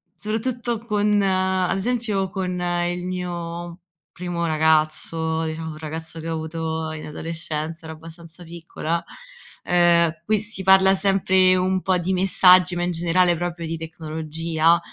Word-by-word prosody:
soprattutto 230 +3 -3
con 210 -1 +1
ad 185 -1 +1
esempio 210 -3 -1
con 180 -2 -4
il 175 0 -2
mio 175 -1 -5 0.3
primo 175 -1 -4
ragazzo, 160 +1 +1
diciamo 160 0 -5
un 155 - -10
ragazzo 160 +1 -6
che 165 - -5
ho - - -2
avuto 160 0 -4
in 155 - -7
adolescenza, 160 +1 -4
ero 160 0 -7
abbastanza 165 +2 -11
piccola, 170 0 -4 0.6
ehm, 170 -2 +3
qui 215 +2 +2
si 210 -2 0
parla 190 0 +6
sempre 190 -1 +3
un 185 0 0
po’ 185 -1 +1
di 180 +2 -2
messaggi 185 -1 +5
ma 175 - -1
in 180 - -1
generale 175 +1 +2
proprio 170 -1 -4
di 165 - -3
tecnologia, 160 0 -1
175 Hz, 140 wpm, -22 LUFS, 160-190 Hz, 0.6 s, parla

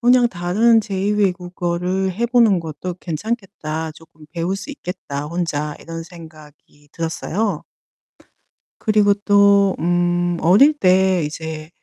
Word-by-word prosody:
'그냥 245 0 +5
다른 215 +5 +2
제2 200 -1 -2
외국어를 180 -1 -1
해 220 +6 -2
보는 230 -6 +4
것도 165 +2 -6
괜찮겠다, 170 -3 -4
쪼끔 155 -1 -18
배울 175 +3 -2
수 200 +9 -8
있겠다 160 - -6
혼자.' 150 -3 -3
이런 165 0 -7
생각이 155 -3 -15
들었어요. 165 +3 -2 1.2
그리고 210 -2 +3
또 200 -1 +4
음 175 +1 +1
어릴 210 - +6
때 185 - +3
이제 155 0 -6
180 Hz, 240 characters per minute, -20 LUFS, 165-200 Hz, 1.2 s, 어릴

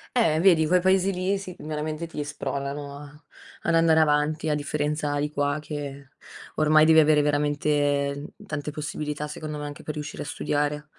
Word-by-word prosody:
Eh 165 -11 +3
vedi 170 -4 +5
quei 180 +3 +3
paesi 190 +1 +3
lì 185 +2 0
sì 185 -2 -8
c - - -15
veramente 155 +1 -4
ti 155 -2 -5
spronano 140 -1 -4
a 145 +1 -13 0.4
ad 165 - +1
andare 165 -1 +5
avanti 155 +1 +2
a 150 - +2
differenza 150 0 -1
di 145 +1 -1
qua, 145 0 0
che 140 -2 -7 0.5
ormai 155 0 +5
devi 160 0 +7
avere 150 -1 +5
veramente 145 -1 +1 0.2
tante 150 -3 -4
possibilità, 150 0 -4
secondo 150 0 -6
me, 150 - -5
anche 145 0 -8
per 155 - -4
riuscire 150 0 -6
a - - -10
studiare. 150 0 -2
150 Hz, 175 wpm, -25 LUFS, 145-155 Hz, 0.5 s, devi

